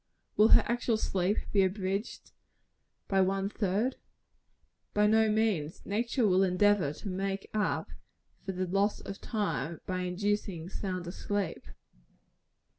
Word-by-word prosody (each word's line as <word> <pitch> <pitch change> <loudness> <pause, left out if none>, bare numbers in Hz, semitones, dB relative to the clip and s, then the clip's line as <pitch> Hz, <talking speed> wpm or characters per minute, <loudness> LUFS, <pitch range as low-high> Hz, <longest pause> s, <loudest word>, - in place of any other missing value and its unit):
Will 215 - +6
her - - +7
actual 235 -1 0
sleep 195 -1 0
be 200 - +4
abridged 195 +2 -2 0.8
one 195 0 +1
third? 210 +5 0 1.0
By 210 0 +4
no 220 +1 +4
means. 210 -8 0
Nature 235 +4 0
will 190 -2 +4
endeavor 190 -3 +3
to 150 - -9
make 195 +1 -3
up 210 -1 -1 0.5
for 195 - -3
the 185 0 -2
loss 195 +3 +1
of 195 - -8
time 205 -7 -2
by 185 -1 -2
inducing 180 -1 -2
sounder 185 -3 -4
sleep. 200 -2 -3
195 Hz, 120 wpm, -30 LUFS, 185-210 Hz, 1.0 s, her